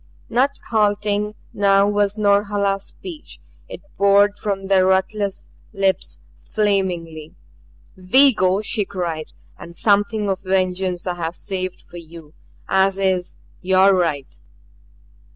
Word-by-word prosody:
Not 265 +4 +1
halting 210 -1 0 0.2
now 200 0 +3
was 205 0 0
Norhala's 200 -1 +1
speech; 340 -5 -11 0.3
it - - -9 0.2
poured 200 +1 +4
from 195 -2 -3
the 190 -1 +3
ruthless 190 +2 -1 0.2
lips 195 -2 -1 0.2
flamingly. 175 -7 -2 0.6
"We 260 +10 +5
go," 190 0 +1
she 215 0 -1
cried. 175 -5 -5 0.3
"And 170 - -11
something 205 +2 +1
of 190 -1 -1
vengeance 185 -1 -1
I 180 - -1
have 165 0 -4
saved 185 -2 -5
for 175 - -13
you 165 -2 -12 0.3
as 190 0 +2
is 185 -2 -1 0.2
your 190 +1 +4
right." 160 -7 -2
195 Hz, 115 wpm, -20 LUFS, 185-205 Hz, 0.6 s, We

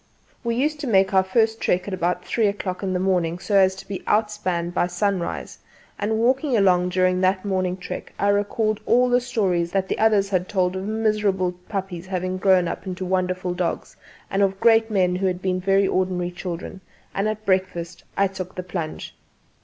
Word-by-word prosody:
We 235 -1 -1
used 295 +4 0
to 290 - -4
make 195 -3 +3
our 190 - +6
first 220 +4 +1
trek 180 +2 +1
at 200 - -4
about 180 -1 -1
three 225 -3 +1
o'clock 200 -2 -3
in 190 -2 -1
the 180 - 0
morning, 180 -3 +1
so 195 +3 -2
as 190 -1 +5
to 190 - -11
be 195 -2 -5
outspanned 210 -5 0
by 175 - +1
sunrise; 180 0 -2 0.4
and 220 +2 0
walking 255 +3 +2
along 180 -3 +3
during 185 0 +2
that 185 +1 +1
morning 185 -2 0
trek 180 - -7
I 200 - +1
recalled 205 +1 +1
all 250 +1 +4
the 245 0 +3
stories 190 -9 0
that 190 -1 +1
the - - -2
others 210 -3 +3
had 185 -1 -1
told 185 -2 +1
of 190 +1 -4
miserable 210 -4 +1 0.2
puppies 190 -3 -4
having 185 0 -2
grown 185 -2 +4
into 185 0 -5
wonderful 185 -1 -1
dogs, 175 -1 -3 0.4
and 195 - +1
of 195 -1 +1
great 225 0 +4
men 180 -4 +2
who 190 +1 0
had 180 -1 -1
been 185 -1 -1
very 195 +1 +3
ordinary 180 -2 0
children; 180 +1 -6 0.3
and 200 +2 0
at 215 0 -5
breakfast 185 -3 -1
I 200 - +4
took 185 -1 -5
the 180 - -4
plunge. 175 -3 -5
190 Hz, 195 wpm, -23 LUFS, 180-205 Hz, 0.4 s, our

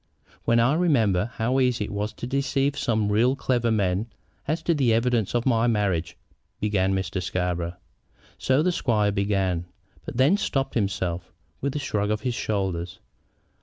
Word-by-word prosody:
"When 115 0 +4
I 120 +4 +4
remember 115 - +2
how 125 +3 +1
easy 125 -5 +1
it - - -8
was 105 +1 -2
to - - -7
deceive 135 +2 0
some 110 -6 0
really 120 +5 +3
clever 120 -3 0
men 100 -1 +1 0.4
as 160 +3 -1
to 170 - +2
the 130 -7 +3
evidence 115 -2 +1
of 120 - +1
my 120 -2 +3
marriage 95 -7 0 0.2
" - - -48
began 95 -2 +1
Mr. 95 0 -2
Scarborough. 90 -1 -2 0.6
So 130 +3 +2
the 180 - +2
squire 110 -10 +1
began, 95 -4 0 0.4
but - - -7
then 140 +10 +4
stopped 135 -9 -1
himself, 95 -5 -2 0.3
with 140 +1 -2
a - - +1
shrug 105 -7 -1
of 105 0 -1
his 125 +1 -1
shoulders. 95 -5 -2
110 Hz, 165 wpm, -25 LUFS, 95-130 Hz, 0.6 s, When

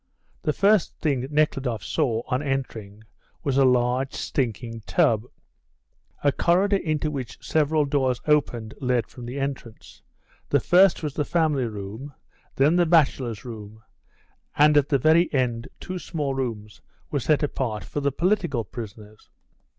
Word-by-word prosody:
The 150 - 0
first 200 +4 +2
thing 135 -5 -1
Nekhludoff 135 -7 0
saw, 120 -7 0
on 130 0 -1
entering, 115 -7 -4 0.4
was 140 -4 0
a 135 0 +5
large, 125 +1 +2
stinking 115 -4 -3
tub. 110 0 +2 1.0
A 145 - +4
corridor 190 +7 +2
into 155 -4 -1
which 130 -5 -6
several 155 -1 +2
doors 135 -3 0
opened 120 -7 +1
led 125 -3 +1
from 120 +1 -11
the 130 +4 -5
entrance. 135 -5 -6 0.5
The - - +3
first 185 -1 +4
was 150 -3 -3
the 150 - -1
family 150 -5 +1
room, 110 +6 -7 0.4
then 150 +6 +3
the 175 -1 +3
bachelors' 135 -9 +2
room, 110 -2 -9 0.7
and 150 +1 +5
at 145 -1 +3
the 140 - +3
very 160 +6 +4
end 125 -4 -1
two 185 0 -5
small 150 -6 -3
rooms 105 - -5 0.3
were 145 - 0
set 150 +4 +1
apart 120 -8 -2
for 145 - -4
the 140 0 0
political 175 - 0
prisoners. 105 -1 -10
135 Hz, 145 wpm, -24 LUFS, 115-150 Hz, 1.0 s, a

